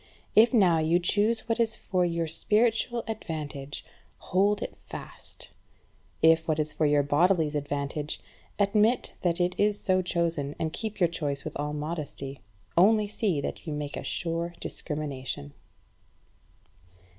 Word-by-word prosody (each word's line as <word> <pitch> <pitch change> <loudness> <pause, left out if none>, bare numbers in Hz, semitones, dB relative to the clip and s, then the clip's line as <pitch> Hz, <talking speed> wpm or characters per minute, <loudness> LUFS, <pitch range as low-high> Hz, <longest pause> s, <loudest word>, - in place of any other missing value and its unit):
If 225 +3 +7
now 185 -9 +5
you 160 +2 +3
choose 210 +6 +2
what 230 0 -2
is 225 -1 +2
for 185 -1 0
your 170 -1 0
spiritual 225 +7 +1
advantage, 150 -9 -5 0.3
hold 200 +3 +1
it - - -6
fast; - - -8 0.7
if 160 0 +5
what 155 -2 +1
is 155 0 -1
for 155 - +2
your 145 -1 +4
bodily 165 +4 +3
advantage, 145 0 -2 0.4
admit 210 +4 +2
that 175 -1 +1
it 180 0 +2
is 205 0 +3
so 185 -1 +3
chosen, 165 -5 -1
and 160 -1 -2
keep 220 -2 -4
your 175 - +5
choice 145 -4 -3
with - - -6
all 150 +1 -2
modesty. 150 -3 -4 0.3
Only 210 +4 +5
see 200 -7 0
that - - -5
you 155 - -2
make 150 -1 -4
a - - -4
sure 170 0 -2
discrimination. 135 - -5
170 Hz, 145 wpm, -28 LUFS, 150-205 Hz, 0.7 s, If